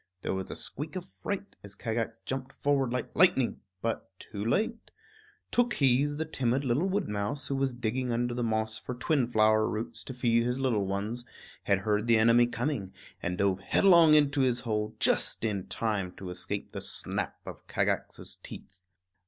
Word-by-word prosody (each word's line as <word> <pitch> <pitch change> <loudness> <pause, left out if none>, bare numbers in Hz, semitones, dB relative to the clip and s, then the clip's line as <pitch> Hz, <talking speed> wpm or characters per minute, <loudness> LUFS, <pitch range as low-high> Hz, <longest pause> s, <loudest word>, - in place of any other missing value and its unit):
There - - -1
was 95 0 -4
a - - -5
squeak 150 +5 -5
of 185 0 -7
fright 200 0 -4
as 100 -1 -9
Kagax 115 0 -2
jumped 135 0 -4
forward 140 -3 +1
like 125 -1 -3
lightning 135 -9 +4 0.2
but 115 0 -2
too 100 0 -7
late. 220 - 0 0.6
Tookhees, 145 - +3
the 160 - -1
timid 135 -3 0
little 135 +10 +1
wood 200 +1 0
mouse, 105 +7 -2
who 140 - 0
was 135 -2 0
digging 125 +1 -1
under 120 +1 0
the 120 - -2
moss 110 -1 -1
for 125 - -6
twin 125 0 +1
flower 110 -2 +3
roots 110 +1 -4
to 130 - -6
feed 115 -2 +3
his 125 +1 0
little 120 -7 +1
ones, 105 +5 -3 0.4
had 100 -1 +2
heard 105 +2 0
the 115 -1 +5
enemy 115 +2 +5
coming, 120 -5 -2 0.3
and 90 +1 -2
dove 95 -1 +2
headlong 170 - +6
into 145 -1 +4
his 125 -2 +2
hole, 105 -2 -2
just - - +2
in 100 -4 -2
time 105 -5 -2
to 95 -2 -7
escape 90 0 -4
the - - -5
snap - - -3
of - - -9
Kagax's - - -2
teeth. 95 0 -11
120 Hz, 175 wpm, -29 LUFS, 110-135 Hz, 0.6 s, headlong